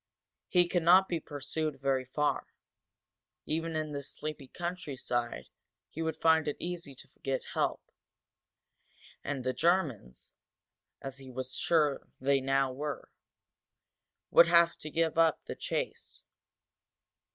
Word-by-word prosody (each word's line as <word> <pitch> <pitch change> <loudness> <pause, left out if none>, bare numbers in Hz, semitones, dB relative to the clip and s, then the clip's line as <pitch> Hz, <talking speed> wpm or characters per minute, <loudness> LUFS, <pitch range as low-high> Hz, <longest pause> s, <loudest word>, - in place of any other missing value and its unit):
He 175 -1 +4
could 175 0 +1
not 185 +3 +6
be 170 - -1
pursued 150 0 -4
very 135 -1 +1
far. 150 +3 0 1.0
Even 165 +1 -2
in 155 -1 -2
this 140 -1 -4
sleepy 150 -3 -6
countryside 145 -9 -3 0.4
he 160 - -5
would 160 0 -1
find 160 -1 +4
it 150 - -1
easy 170 -5 -5
to - - -12
get 135 -1 -1
help, - - 0 1.4
and 135 -3 -3
the 130 0 0
Germans, 140 - 0 0.7
as 135 -1 -5
he 135 -1 -11
was 130 0 -5
now - - -1
sure 150 -4 +2
they 135 +1 +2
were, 135 +2 -1 1.2
would 170 - +8
have 170 0 +5
to 155 - -7
give 165 +1 +1
up 165 -2 +3
the - - -5
chase. - - -4
150 Hz, 130 wpm, -31 LUFS, 135-165 Hz, 1.4 s, would